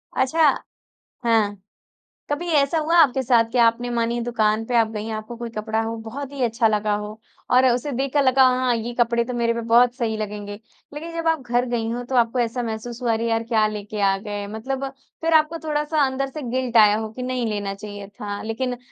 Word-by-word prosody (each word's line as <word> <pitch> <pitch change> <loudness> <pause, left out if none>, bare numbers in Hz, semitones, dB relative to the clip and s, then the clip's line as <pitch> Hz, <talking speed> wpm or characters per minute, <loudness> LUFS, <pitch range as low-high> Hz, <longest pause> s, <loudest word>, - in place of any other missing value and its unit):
अच्छा। 310 +4 +3 0.8
हाँ। 210 -4 +1 0.7
कभी 335 +4 -2
ऐसा 280 +3 +2
हुआ 325 +3 +1
आपके 270 -5 +5
साथ 235 -2 +4
कि 250 - 0
आपने 235 +1 +3
मानिए 235 0 0
दुकान 220 -2 +1
पे 245 - -3
आप 225 -1 +4
गई, 215 0 -5
आपको 215 +2 -6
कोई 235 -1 -6
कपड़ा 220 +1 -1
हो 225 +1 -3
बहुत 275 +5 -6
ही 275 -2 -4
अच्छा 230 -1 +2
लगा 210 -1 +1
हो, 210 +1 -7 0.3
और 255 +1 +5
उसे 250 +4 -1
देखकर 275 +3 +1
लगा 260 0 +5 0.2
हाँ 250 -2 +2
ये 235 +2 -4
कपड़े 235 0 +2
तो 250 0 -5
मेरे 235 -1 +1
पे 235 - -2
बहुत 240 +2 +4
सही 230 -4 -2
लगेंगे। 205 -1 -5 0.4
लेकिन 330 +3 -7
जब 330 0 -3
आप 320 -3 +2
घर 245 +1 +1
गई 230 -2 -1
हों, 245 +1 -3
तो 260 +1 -2
आपको 240 +1 +2
ऐसा 240 +1 -1
महसूस 235 +2 -5
हुआ, 235 -2 +1
अरे 230 +1 0
यार 225 0 +1
क्या 225 -2 +2
लेके 210 0 -5
आ 195 -1 +3
गए। 205 0 -5
मतलब 260 +6 -4 0.4
फिर 325 0 0
आपको 315 +1 +3
थोड़ा-सा 300 0 +1
अंदर 265 +1 -2
से 300 +2 -7
गिल्ट 250 -1 -1
आया 210 -1 +7
हो 220 -1 -4
कि 250 - -7
नहीं 250 -2 -2
लेना 205 -2 -3
चाहिए 205 -1 -9
था। 205 0 -6
लेकिन 245 +3 -3
235 Hz, 215 wpm, -22 LUFS, 220-260 Hz, 0.8 s, आया